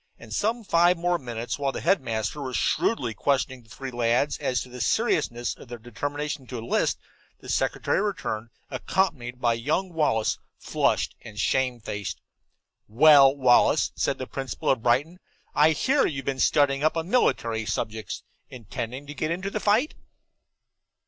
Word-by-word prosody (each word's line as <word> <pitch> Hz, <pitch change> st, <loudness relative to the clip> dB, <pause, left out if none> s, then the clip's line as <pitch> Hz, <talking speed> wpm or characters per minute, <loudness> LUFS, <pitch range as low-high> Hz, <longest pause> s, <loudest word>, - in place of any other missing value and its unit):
And -, -, -10 dB
in 230 Hz, +2 st, 0 dB
five 175 Hz, -2 st, +4 dB
more 175 Hz, 0 st, 0 dB
minutes, 120 Hz, 0 st, -5 dB
while 140 Hz, -1 st, 0 dB
the -, -, -6 dB
headmaster 130 Hz, -, 0 dB
was 130 Hz, -4 st, -3 dB
shrewdly 120 Hz, -, 0 dB
questioning 130 Hz, +3 st, 0 dB
the 110 Hz, -, -24 dB
three 135 Hz, +3 st, -7 dB
lads 120 Hz, +4 st, +1 dB
as 125 Hz, -1 st, 0 dB
to 125 Hz, -, -13 dB
the 125 Hz, 0 st, -7 dB
seriousness 120 Hz, -, 0 dB
of -, -, -14 dB
their 120 Hz, 0 st, -7 dB
determination 145 Hz, +4 st, -4 dB
to 125 Hz, -, -6 dB
enlist, 115 Hz, +1 st, 0 dB, 0.4 s
the -, -, -13 dB
secretary -, -, 0 dB
returned, 150 Hz, -, -3 dB, 0.2 s
accompanied 125 Hz, -10 st, -1 dB
by 120 Hz, -2 st, +2 dB
young 155 Hz, +10 st, -1 dB
Wallace, 130 Hz, -9 st, +1 dB, 0.2 s
flushed -, -, 0 dB
and 110 Hz, -3 st, -10 dB
shamefaced. 120 Hz, -4 st, -1 dB, 0.7 s
"Well, 140 Hz, +3 st, +7 dB
Wallace," 125 Hz, -3 st, +4 dB
said -, -, 0 dB
the -, -, -5 dB
principal 135 Hz, -4 st, -2 dB
of 130 Hz, -, 0 dB
Brighton, 145 Hz, +9 st, +1 dB, 0.3 s
"I 150 Hz, +1 st, +5 dB
hear 265 Hz, -, +2 dB
you've 135 Hz, -3 st, -4 dB
been 135 Hz, -1 st, -2 dB
studying 140 Hz, 0 st, +3 dB
up 155 Hz, +1 st, +2 dB
on 165 Hz, +1 st, -2 dB
military 115 Hz, -, +1 dB
subjects. 110 Hz, 0 st, -3 dB, 0.3 s
Intending 125 Hz, +3 st, -6 dB
to 145 Hz, -, -8 dB
get 155 Hz, +2 st, -2 dB
into 185 Hz, +4 st, -3 dB
the 215 Hz, -, -2 dB
fight?" 215 Hz, +9 st, +2 dB
135 Hz, 155 wpm, -26 LUFS, 120-160 Hz, 0.7 s, Well